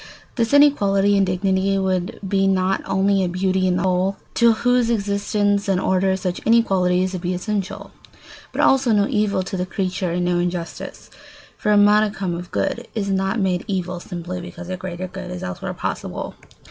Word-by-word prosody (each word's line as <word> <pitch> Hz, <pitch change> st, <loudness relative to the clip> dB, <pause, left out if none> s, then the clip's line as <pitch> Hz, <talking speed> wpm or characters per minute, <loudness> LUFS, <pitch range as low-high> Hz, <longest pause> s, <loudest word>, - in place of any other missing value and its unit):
This 230 Hz, -2 st, 0 dB
inequality 205 Hz, -9 st, +4 dB
in 195 Hz, -1 st, +3 dB
dignity 190 Hz, +1 st, +1 dB
would 185 Hz, -2 st, -1 dB
be 195 Hz, 0 st, +2 dB
not 190 Hz, 0 st, +1 dB
only 195 Hz, 0 st, +2 dB
a 180 Hz, -, 0 dB
beauty 185 Hz, +1 st, 0 dB
in 180 Hz, -1 st, +1 dB
the -, -, -1 dB
whole, 185 Hz, +1 st, +1 dB, 0.2 s
to 235 Hz, -1 st, +5 dB
whose 245 Hz, +1 st, +2 dB
existence 205 Hz, -1 st, 0 dB
and 190 Hz, -2 st, +2 dB
order 190 Hz, 0 st, +1 dB
such 180 Hz, -1 st, -3 dB
inequalities 185 Hz, -5 st, +2 dB
would 185 Hz, -, -4 dB
be 180 Hz, 0 st, -1 dB
essential, 200 Hz, +1 st, -4 dB, 0.6 s
but -, -, -1 dB
also 265 Hz, -3 st, +4 dB
no 205 Hz, -1 st, +3 dB
evil 210 Hz, -3 st, 0 dB
to 190 Hz, -, -5 dB
the 180 Hz, -, -1 dB
creature 185 Hz, 0 st, -2 dB
and 175 Hz, 0 st, 0 dB
no 175 Hz, 0 st, +1 dB
injustice; 175 Hz, -1 st, -5 dB, 0.4 s
for 210 Hz, -, -1 dB
a 210 Hz, -, +5 dB
modicum 205 Hz, -2 st, +3 dB
of 175 Hz, +1 st, -6 dB
good 240 Hz, -, -2 dB
is 200 Hz, -3 st, -1 dB
not 195 Hz, +3 st, 0 dB
made 185 Hz, -3 st, 0 dB
evil 185 Hz, -3 st, -2 dB
simply 175 Hz, +1 st, -6 dB
because 175 Hz, 0 st, -9 dB
a 185 Hz, -, -2 dB
greater 185 Hz, 0 st, -6 dB
good 185 Hz, 0 st, -8 dB
is 180 Hz, 0 st, -6 dB
elsewhere 90 Hz, -, -5 dB
possible. -, -, -4 dB
190 Hz, 180 wpm, -21 LUFS, 180-205 Hz, 0.6 s, to